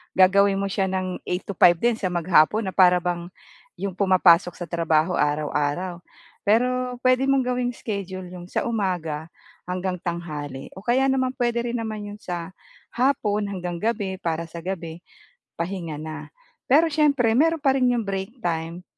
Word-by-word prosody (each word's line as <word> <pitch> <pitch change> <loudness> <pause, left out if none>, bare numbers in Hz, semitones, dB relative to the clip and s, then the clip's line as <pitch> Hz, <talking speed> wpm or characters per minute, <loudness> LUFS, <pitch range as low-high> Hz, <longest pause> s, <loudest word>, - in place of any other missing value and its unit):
gagawin 195 +1 +5
mo 200 - -1
siya 195 0 0
ng 185 -1 -3
8-5 180 -1 +3
din 240 -1 +2
sa 185 -5 -2
maghapon 175 +4 +3
na 190 - -3
para 180 -2 +6
bang 175 0 -3 0.5
'yong 195 -2 -4
pumapasok 180 -3 +4
sa 175 - -5
trabaho 165 0 +1
araw-araw. 150 +4 -1 0.5
Pero 250 +3 +1
puwede 255 +1 +3
mong 270 -2 +3
gawing 250 -1 0
schedule 190 -4 -5
'yong 180 -1 -9
sa - - -1
umaga 170 -8 -2 0.4
hanggang 180 0 -2
tanghali 150 -6 -5
o 190 - -9
kaya 255 +3 +3
naman 260 -1 +1
puwede 240 -1 0
rin 245 - -2
naman 215 -2 -4
'yon 210 - -10
sa 175 0 -5 0.4
hapon 225 -5 +1
hanggang 180 -3 -4
gabi, 205 -4 -1
para 165 0 -2
sa 170 - -8
gabi 170 -2 -5 0.6
pahinga 170 -3 -4
na. 155 0 -7 0.4
Pero 315 +5 +6
siyempre 285 -6 +3
meron 325 +2 +3
pa 270 -2 +3
rin 255 -2 +3
'yong 235 -3 0
break 195 +5 -4
time, 170 +1 -3
190 Hz, 160 wpm, -24 LUFS, 170-230 Hz, 0.6 s, para